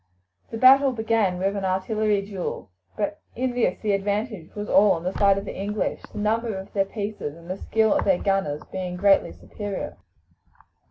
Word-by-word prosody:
The 225 - -5
battle 270 +3 +7
began 220 -5 +1
with 195 +2 0
an 200 - -3
artillery 200 +2 0
duel, 195 - -5 0.3
but 205 0 -2
in 255 +1 -1
this 245 -1 +1
the 215 - 0
advantage 205 -2 -2
was 210 0 -4
all 200 0 +5
on 165 - -4
the 185 +2 -2
side 200 -1 +4
of 195 - -4
the - - -6
English, 205 +2 -2
the - - -10
number 220 0 0
of 190 +1 -9
their 195 -1 +2
pieces 200 -7 -5
and 170 0 -14
the 185 +1 -4
skill 220 -1 +2
of - - +1
their 190 -3 +4
gunners 195 -8 -1
being 185 -1 -4
greatly 195 - +3
superior. 195 - -6
200 Hz, 185 wpm, -24 LUFS, 190-215 Hz, 0.3 s, battle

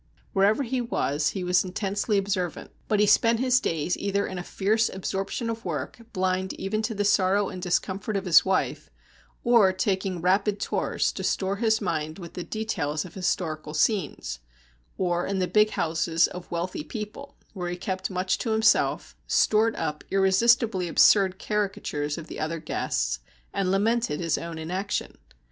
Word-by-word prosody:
Wherever 205 +6 +3
he 255 0 -1
was, 145 -10 0
he 190 - -4
was 180 0 +3
intensely 200 +3 -1
observant, 190 -3 -2 0.2
but 210 -2 +1
he 210 - +5
spent 230 +2 +4
his 255 0 +3
days 165 -4 -1
either 200 0 -1
in 185 - -5
a - - -5
fierce 215 +5 +1
absorption 195 +4 -3
of 230 0 -4
work, - - -4
blind 185 0 -1
even 215 +3 -2
to 220 0 -2
the 205 0 0
sorrow 200 0 +3
and 180 - -7
discomfort 190 +3 -1
of 195 - -4
his 170 -3 +7
wife, 190 0 -1 0.5
or 230 -5 +5
taking 185 -1 -1
rapid 195 +4 +1
tours - - 0
to - - -6
store 195 +1 0
his 220 0 +2
mind 155 -4 -2
with 170 -3 -9
the 180 - -5
details 165 -10 -2
of 175 - -11
historical 155 -4 -2
scenes, 150 - 0 0.6
or 175 -1 0
in 195 - -1
the 185 - +1
big 210 +3 +3
houses 165 -2 +1
of 180 -1 -7
wealthy 175 - -3
people, 225 +4 -7 0.2
where 180 -3 -4
he 175 - -4
kept 185 +1 -3
much 185 0 -1
to 230 - -2
himself, 220 0 +2
stored 220 +1 +3
up 150 0 -3
irresistibly 195 0 +3
absurd 190 +2 +5
caricatures 190 -9 -2
of 165 - -7
the - - -8
other 160 +2 -2
guests, 155 - -2 0.3
and 195 -2 0
lamented 210 -3 +1
his 170 -2 0
own 165 -1 -6
inaction. 185 +5 -3
190 Hz, 165 wpm, -26 LUFS, 175-210 Hz, 0.6 s, his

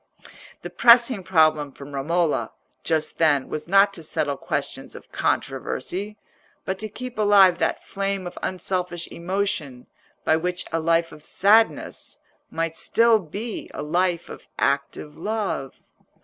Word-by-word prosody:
The - - -7
pressing 240 -2 +5
problem 155 -5 +2
for 140 - -11
Romola 150 +4 -1 0.3
just 160 -1 -1
then 145 -5 +3
was 155 - -5
not 200 +2 +5
to 170 - -8
settle 150 -2 -1
questions - - -4
of - - -13
controversy, 205 +4 -2 0.5
but 190 0 -3
to 215 +1 -3
keep 250 +2 -8
alive 195 -4 +5
that - - -1
flame 195 -1 -2
of 175 - -7
unselfish 180 -2 -2
emotion 170 -8 -3 0.4
by 160 - +4
which 180 +2 -2
a 165 - 0
life 165 +1 +1
of 150 - -13
sadness 215 +7 +2 0.3
might 165 0 -3
still 230 +3 +3
be 205 +6 -6
a - - -4
life 175 +2 0
of - - -11
active 140 +2 -1
love. 205 -9 -3
175 Hz, 135 wpm, -23 LUFS, 155-200 Hz, 0.5 s, pressing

